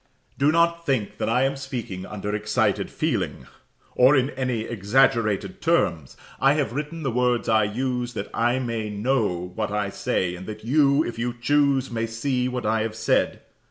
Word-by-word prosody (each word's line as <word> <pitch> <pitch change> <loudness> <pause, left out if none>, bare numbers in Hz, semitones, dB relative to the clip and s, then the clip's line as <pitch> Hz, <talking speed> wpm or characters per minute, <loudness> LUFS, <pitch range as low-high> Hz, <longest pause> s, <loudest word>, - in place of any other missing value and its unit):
Do 140 +2 +4
not 170 +1 +2
think 130 -9 -1
that - - 0
I 125 +3 +3
am 135 +1 +1
speaking 120 -9 -6
under 105 0 -4
excited 105 0 0
feeling, - - -2 0.5
or 130 +3 +5
in 135 +1 +2
any 130 -3 -2
exaggerated 115 - +1
terms. 85 - 0 0.2
I 135 +1 +5
have 145 -7 -1
written 150 +4 -4
the 135 - 0
words 125 0 +1
I 110 -1 +4
use, 125 +2 -2
that 100 -1 -5
I 120 +2 +1
may 115 -4 -3
know 105 -5 -1
what 110 +3 -2
I 105 -1 -2
say, 90 -2 -1
and 95 +1 -9
that 110 0 -8
you, 140 +3 +4
if 120 - -6
you 120 +1 -2
choose, 140 -1 +2
may 115 -1 -1
see 125 +3 -1
what 125 -2 -3
I 110 +1 +1
have 110 0 -3
said. 110 0 +1
120 Hz, 180 wpm, -24 LUFS, 105-135 Hz, 0.5 s, or